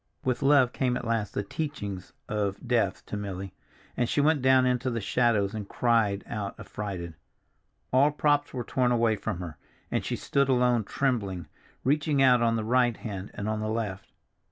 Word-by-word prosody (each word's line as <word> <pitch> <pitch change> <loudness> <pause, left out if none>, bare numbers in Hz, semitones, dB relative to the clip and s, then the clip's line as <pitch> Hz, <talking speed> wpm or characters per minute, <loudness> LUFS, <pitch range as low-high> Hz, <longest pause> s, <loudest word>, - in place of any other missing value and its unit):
With 130 +1 0
love 135 -3 +4
came 125 -2 0
at - - -6
last 115 -3 -1
the 100 - 0
teaching 105 -6 -4 0.3
of 105 +2 -2
death 115 -6 +1
to - - -5
Milly, 95 -2 -5 0.4
and 120 - 0
she - - +1
went 150 0 +3
down 130 0 +5
into 125 0 +1
the 115 -1 -2
shadows 110 -2 +1
and 105 -2 -5
cried 115 -5 +1
out 105 -3 -5
affrighted. 95 -5 -5 0.8
All 135 +3 +5
props 145 -1 +1
were 125 -2 -4
torn 125 +1 +1
away 115 -2 +3
from 95 - -4
her, 80 -5 -7 0.3
and - - 0
she - - -2
stood 140 -1 0
alone 125 -3 +3
trembling, 100 - -1 0.4
reaching 145 +1 +1
out 125 -3 +5
on 115 -1 +2
the 110 - -1
right 120 0 +2
hand 100 -3 -6
and 100 - -4
on 110 0 -1
the 110 0 -2
left. 105 -4 -3
115 Hz, 180 wpm, -28 LUFS, 100-130 Hz, 0.8 s, down